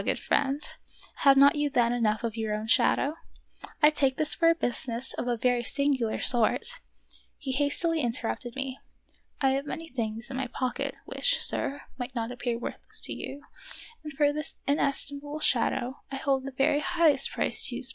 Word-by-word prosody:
good - - 0
friend, 285 +1 0 0.5
have 275 -1 +5
not 280 +1 +6
you 295 0 0
then 240 -4 +2
enough 220 -2 0
of 230 -2 -3
your 220 -2 -2
own 215 +1 -4
shadow 275 +4 +3
1 - - -12 0.7
I 300 - +9
take 270 -3 +1
this 310 0 0
for 330 -1 +3
a 335 - +4
business 245 -4 0
of 245 - -4
a 240 -1 0
very 245 +1 +1
singular 265 -3 0
sort" 240 - +3 0.3
— - - -42 0.3
He 275 -4 -5
hastily 295 +4 +1
interrupted 240 0 -2
me: 270 -1 -5 0.6
"I 270 - +4
have 275 +2 -2
many 325 +2 -6
things 230 0 -4
in 260 - -4
my 265 -1 -2
pocket 250 +1 -3
which, - - 0
sir, 285 +1 +3 0.2
might 245 +1 -6
not 230 0 -3
appear 245 -1 -3
worthless 235 - -4
to - - -4
you, 285 +1 -8 0.6
and 305 - -7
for 290 +1 +2
this 305 -1 -4
inestimable 285 +1 0
shadow 255 -1 0
I - - -4
hold 270 -1 -1
the 275 - -5
very 270 +2 +1
highest 335 -2 +3
price - - +1
too - - -1
small." - - +3
270 Hz, 185 wpm, -27 LUFS, 240-290 Hz, 0.7 s, I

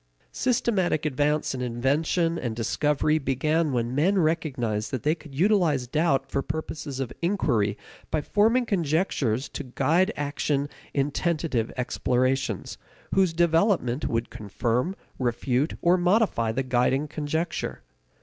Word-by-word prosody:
Systematic 205 - +1
advance 150 +1 +1
in 130 - -4
invention 150 +8 0
and 120 -3 -3
discovery 150 +6 +1
began 150 +4 +1
when 120 -1 -1
men 175 +9 +2
recognized 135 - 0
that 130 - -4
they 150 - +3
could 155 -4 -12
utilize 170 -6 +2
doubt 150 +2 +1
for 140 - 0
purposes 150 -1 -5
of 130 -3 -3
inquiry 140 - +1 0.3
by 155 - 0
forming 225 - +2
conjectures 155 - 0
to - - -6
guide 155 - +1
action 145 0 -1 0.2
in 140 +1 0
tentative 150 -8 -1
explorations, 130 +1 -1 0.3
whose 190 -3 +3
development 165 - +2
would 115 0 -2
confirm, 115 - -1 0.2
refute, 125 +3 0
or 175 +1 +5
modify 180 - +2
the 130 +4 -1
guiding 130 +3 +1
conjecture. 155 +3 -3
145 Hz, 125 wpm, -26 LUFS, 125-170 Hz, 0.3 s, or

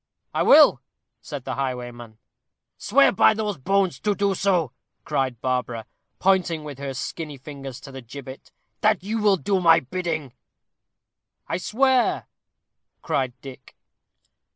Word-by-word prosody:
"I - - 0
will," - - +7 0.4
said - - -7
the - - -3
highwayman. 120 -4 -5 0.6
"Swear - - +4
by 220 - +4
those 210 -6 -3
bones 195 +5 +1
to 210 -1 0
do 200 -1 +1
so," 180 -8 +1 0.3
cried 130 -3 -1
Barbara, 125 -3 -2 0.3
pointing 185 -4 +1
with 145 -3 -8
her 140 -1 -5
skinny 150 +2 -5
fingers 135 -2 -9
to 135 - -11
the 130 0 -8
gibbet; 130 +2 -10 0.3
"that 215 -3 +2
you 220 +3 -2
will 205 -2 +4
do 185 +5 0
my 165 -2 +6
bidding." 155 -3 -4 1.1
"I 170 - -1
swear," 255 +6 +2 0.8
cried 130 -2 -1
Dick. 130 -1 -12
150 Hz, 130 wpm, -24 LUFS, 130-195 Hz, 1.1 s, will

